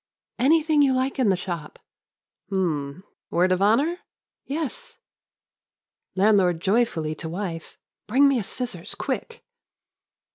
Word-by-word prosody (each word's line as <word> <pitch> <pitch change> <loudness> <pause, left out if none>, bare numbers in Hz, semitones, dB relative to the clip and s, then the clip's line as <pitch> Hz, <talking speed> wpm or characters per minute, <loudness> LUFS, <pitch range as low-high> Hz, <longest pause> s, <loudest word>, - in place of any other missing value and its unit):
"Anything 305 +3 +4
you 275 -2 +4
like 260 +1 -1
in 245 -6 +3
the 190 - +3
shop." 175 -4 -6 0.7
"Hm, 170 -4 -2 0.3
word 180 +2 +2
of 185 +1 +1
honor?" 270 - +3 0.5
"Yes." 320 - -4 1.2
Landlord 190 -4 +3
joyfully 190 -5 +1
to 160 +1 -7
wife. 170 -2 -5 0.3
"Bring 270 +6 +5
me 275 -3 +2
a - - -3
scissors, 245 +5 -4
quick 465 +1 -4
205 Hz, 115 wpm, -24 LUFS, 180-275 Hz, 1.2 s, Bring